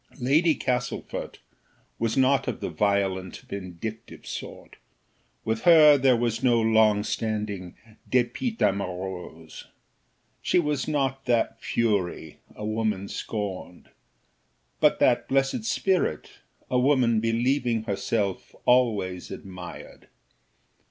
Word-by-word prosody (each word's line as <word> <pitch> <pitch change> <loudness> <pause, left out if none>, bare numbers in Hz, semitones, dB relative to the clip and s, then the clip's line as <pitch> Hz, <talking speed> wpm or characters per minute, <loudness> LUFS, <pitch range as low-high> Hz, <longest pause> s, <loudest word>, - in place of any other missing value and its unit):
Lady 150 +6 +3
Castlefort 125 -1 -3 0.6
was 115 +1 -1
not 130 0 +3
of - - -3
the - - -4
violent 95 -3 0
vindictive 100 - -7
sort, - - -8 0.7
with 110 0 -1
her 155 -2 +8
there 130 -2 +4
was 115 -1 -1
no 120 -3 +3
long 110 -1 +4
lasting 105 -6 -3 0.3
dépit 130 - 0
amoureux. 90 -4 -3 0.8
She - - +1
was 150 -5 0
not 135 -3 -1
that 115 -2 0
fury, 100 -8 -1 0.2
a 105 - -6
woman 110 -2 -1
scorned, 95 -4 -6 0.9
but - - +4
that - - +2
blessed 135 - +1
spirit, 185 - 0 0.4
a 125 - +1
woman 125 -4 +3
believing 115 +1 0
herself 100 -1 -2
always 105 -8 +2
admired. 90 -2 -10
115 Hz, 105 wpm, -26 LUFS, 100-130 Hz, 0.9 s, her